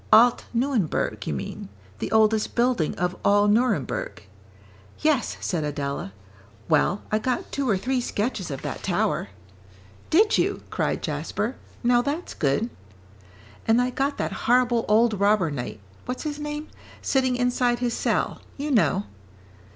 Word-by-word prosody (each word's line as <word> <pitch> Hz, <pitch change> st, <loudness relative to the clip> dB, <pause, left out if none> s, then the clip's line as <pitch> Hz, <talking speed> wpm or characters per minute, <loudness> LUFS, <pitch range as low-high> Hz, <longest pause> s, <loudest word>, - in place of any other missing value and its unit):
"Alt 235 Hz, +3 st, +6 dB
Nuenberg, 235 Hz, -, 0 dB
you -, -, -1 dB
mean, 70 Hz, -, -6 dB, 0.3 s
the -, -, -3 dB
oldest 220 Hz, -1 st, +3 dB
building 240 Hz, -9 st, +2 dB
of 180 Hz, +1 st, -1 dB
all 205 Hz, +1 st, +4 dB
Nuremberg." 255 Hz, -, 0 dB, 0.7 s
"Yes," 300 Hz, -6 st, +1 dB
said 170 Hz, -5 st, -1 dB
Adela, 140 Hz, -7 st, -3 dB, 0.6 s
"well, 170 Hz, +5 st, +2 dB
I 215 Hz, -, +2 dB
got 250 Hz, +3 st, -2 dB
two 275 Hz, -2 st, -1 dB
or 200 Hz, -, +3 dB
three 255 Hz, +6 st, 0 dB
sketches 210 Hz, -5 st, -2 dB
of 135 Hz, -2 st, -5 dB
that -, -, -4 dB
tower." -, -, 0 dB, 0.8 s
"Did 420 Hz, +6 st, +4 dB
you?" -, -, 0 dB
cried -, -, -1 dB
Jasper, -, -, -2 dB, 0.3 s
"now 240 Hz, 0 st, +4 dB
that's 295 Hz, +7 st, -3 dB
good." 150 Hz, -, 0 dB, 1.0 s
"And 225 Hz, +2 st, +5 dB
I 250 Hz, 0 st, +1 dB
got 275 Hz, +3 st, -1 dB
that -, -, -2 dB, 0.2 s
horrible 245 Hz, -1 st, +4 dB
old 220 Hz, -1 st, +3 dB
robber 200 Hz, -5 st, +3 dB
knight, 120 Hz, -6 st, -5 dB, 0.3 s
what's 250 Hz, -, -3 dB
his 300 Hz, -1 st, -4 dB
name? 295 Hz, +1 st, -5 dB, 0.3 s
sitting 260 Hz, -2 st, +2 dB
inside 245 Hz, 0 st, +1 dB
his 240 Hz, -1 st, -1 dB
cell, -, -, 0 dB, 0.2 s
you 290 Hz, +2 st, -3 dB
know." 205 Hz, -5 st, +3 dB
235 Hz, 145 wpm, -25 LUFS, 200-255 Hz, 1.0 s, Alt